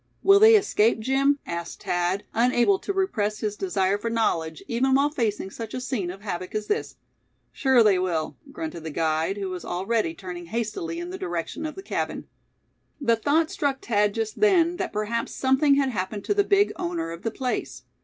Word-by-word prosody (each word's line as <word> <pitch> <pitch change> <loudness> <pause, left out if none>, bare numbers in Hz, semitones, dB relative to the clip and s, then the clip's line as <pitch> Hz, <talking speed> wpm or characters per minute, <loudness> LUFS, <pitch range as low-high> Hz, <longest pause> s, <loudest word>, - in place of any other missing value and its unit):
"Will 395 0 +7
they 440 +1 +8
escape, 235 - +3
Jim?" 270 +4 +2
asked 170 0 -6
Thad, 175 +3 0
unable 245 - +3
to - - -3
repress 225 - -1
his 210 -1 -2
desire 195 0 0
for 230 - -2
knowledge, 165 -9 -1
even 260 +3 +2
while 285 +2 +3
facing 215 -8 -2
such 225 0 -7
a - - -2
scene 250 -8 -2
of 190 +2 -8
havoc 185 -2 -5
as 215 0 -1
this. 420 - -2 0.6
"Sure 265 -4 +4
they 200 -4 +4
will," 170 -4 -1 0.2
grunted 310 - -6
the 160 - -4
guide, 160 +4 0
who 195 -2 -3
was 180 -1 -5
already 190 -1 -1
turning 175 -1 -8
hastily 235 - -3
in 345 +1 -5
the 375 - -6
direction 175 - -3
of 305 - -8
the 385 - -8
cabin. - - -3 0.7
The 235 -5 +3
thought 300 +7 +1
struck 275 -2 -2
Thad 210 -2 +2
just 220 -1 -3
then 355 -5 +4
that - - -3
perhaps 215 +2 -2
something 275 +2 +3
had 275 -1 +2
happened 200 -1 -3
to - - +2
the 405 0 +3
big 400 +1 +3
owner 165 -1 -3
of 170 +1 -8
the 225 - -1
place. 250 +2 -4
225 Hz, 195 wpm, -25 LUFS, 185-285 Hz, 0.7 s, they